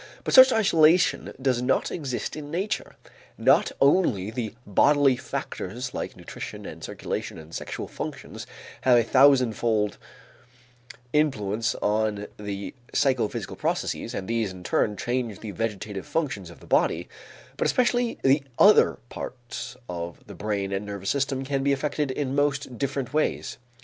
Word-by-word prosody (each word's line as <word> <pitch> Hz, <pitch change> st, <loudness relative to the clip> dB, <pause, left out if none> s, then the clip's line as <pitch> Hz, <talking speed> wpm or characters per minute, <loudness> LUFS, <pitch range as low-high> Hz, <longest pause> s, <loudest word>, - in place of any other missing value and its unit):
But -, -, -2 dB
such 260 Hz, 0 st, +10 dB
isolation 180 Hz, -6 st, +4 dB
does 130 Hz, -2 st, +1 dB
not 125 Hz, +2 st, +1 dB
exist 135 Hz, -7 st, -3 dB
in 150 Hz, -1 st, -7 dB
nature. 185 Hz, +7 st, -3 dB, 0.4 s
Not -, -, +4 dB
only 130 Hz, -, +3 dB
the 115 Hz, -1 st, -4 dB
bodily 140 Hz, +6 st, +4 dB
factors 125 Hz, +1 st, -5 dB
like -, -, -5 dB
nutrition -, -, -8 dB
and -, -, -9 dB
circulation -, -, -4 dB
and 80 Hz, +1 st, -12 dB
sexual -, -, -5 dB
functions -, -, -7 dB, 0.3 s
have 125 Hz, -2 st, +5 dB
a 120 Hz, -, +4 dB
thousandfold 120 Hz, -5 st, +3 dB, 1.1 s
influence 115 Hz, -8 st, +1 dB
on 105 Hz, -1 st, 0 dB
the 100 Hz, -1 st, -5 dB, 0.2 s
psychophysical 130 Hz, -6 st, 0 dB
processes, -, -, -2 dB
and 95 Hz, -, -4 dB
these 115 Hz, -3 st, 0 dB
in 90 Hz, -1 st, -10 dB
turn 105 Hz, +3 st, +1 dB
change 120 Hz, -4 st, -2 dB
the 110 Hz, -, -5 dB
vegetative 105 Hz, -1 st, -4 dB
functions 130 Hz, -, -2 dB
of 85 Hz, -, -14 dB
the -, -, -13 dB
body, -, -, +1 dB, 0.5 s
but -, -, 0 dB
especially 245 Hz, -1 st, +1 dB
the 135 Hz, +2 st, +4 dB, 0.2 s
other 210 Hz, +1 st, +6 dB
parts 125 Hz, 0 st, -7 dB
of 85 Hz, -1 st, -6 dB
the 100 Hz, -, -10 dB
brain 100 Hz, 0 st, -2 dB
and 100 Hz, +1 st, -2 dB
nervous 100 Hz, -1 st, -3 dB
system 135 Hz, -1 st, -1 dB
can 135 Hz, 0 st, -1 dB
be 140 Hz, +1 st, +2 dB
affected 145 Hz, +1 st, -1 dB
in 135 Hz, 0 st, -2 dB
most 145 Hz, -2 st, 0 dB
different 140 Hz, -1 st, -2 dB
ways. 155 Hz, -5 st, -1 dB
125 Hz, 145 wpm, -26 LUFS, 105-145 Hz, 1.1 s, such